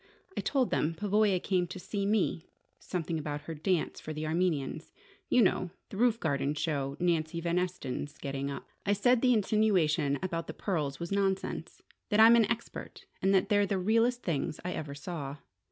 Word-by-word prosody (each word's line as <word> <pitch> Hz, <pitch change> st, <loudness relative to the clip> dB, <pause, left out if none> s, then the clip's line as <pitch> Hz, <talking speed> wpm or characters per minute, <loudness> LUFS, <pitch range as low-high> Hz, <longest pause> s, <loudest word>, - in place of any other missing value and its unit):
I -, -, -1 dB
told 265 Hz, -4 st, +1 dB
them 165 Hz, +2 st, +1 dB
Pavoya 205 Hz, 0 st, +2 dB
came 180 Hz, -1 st, 0 dB
to 185 Hz, -, -7 dB
see 200 Hz, +2 st, -3 dB
me 200 Hz, -6 st, +1 dB, 0.3 s
something 165 Hz, -3 st, -3 dB
about 150 Hz, -1 st, -4 dB
her 165 Hz, +2 st, -6 dB
dance 165 Hz, +2 st, -1 dB
for 155 Hz, -, -6 dB
the 155 Hz, +1 st, -4 dB
Armenians: 160 Hz, -2 st, -1 dB, 0.4 s
you 250 Hz, -, +5 dB
know, 185 Hz, -1 st, +1 dB, 0.2 s
the 195 Hz, -, -7 dB
roof 235 Hz, 0 st, +3 dB
garden 140 Hz, -3 st, 0 dB
show 140 Hz, -3 st, -2 dB
Nancy 170 Hz, -2 st, 0 dB
Van 170 Hz, +1 st, +1 dB
Esten's 150 Hz, -5 st, -4 dB
getting 140 Hz, 0 st, -3 dB
up. 140 Hz, -, -6 dB, 0.2 s
I 205 Hz, -, +2 dB
said 240 Hz, +4 st, +3 dB
the 255 Hz, -, +4 dB
insinuation 185 Hz, -, +2 dB
about 170 Hz, -3 st, -2 dB
the -, -, -6 dB
pearls 150 Hz, -8 st, -2 dB
was 170 Hz, +1 st, -5 dB
nonsense: 195 Hz, -1 st, -1 dB, 0.3 s
that 210 Hz, -1 st, +2 dB
I'm 225 Hz, +2 st, +9 dB
an 225 Hz, -3 st, +4 dB
expert, 230 Hz, +1 st, -5 dB, 0.2 s
and 195 Hz, -, +3 dB
that 190 Hz, +2 st, +2 dB
they're 205 Hz, -1 st, +3 dB
the 195 Hz, -, 0 dB
realest 230 Hz, +6 st, +2 dB
things 150 Hz, -3 st, -2 dB
I 180 Hz, -, -1 dB
ever 145 Hz, -4 st, -5 dB
saw. 145 Hz, -2 st, -5 dB
180 Hz, 185 wpm, -30 LUFS, 155-205 Hz, 0.4 s, I'm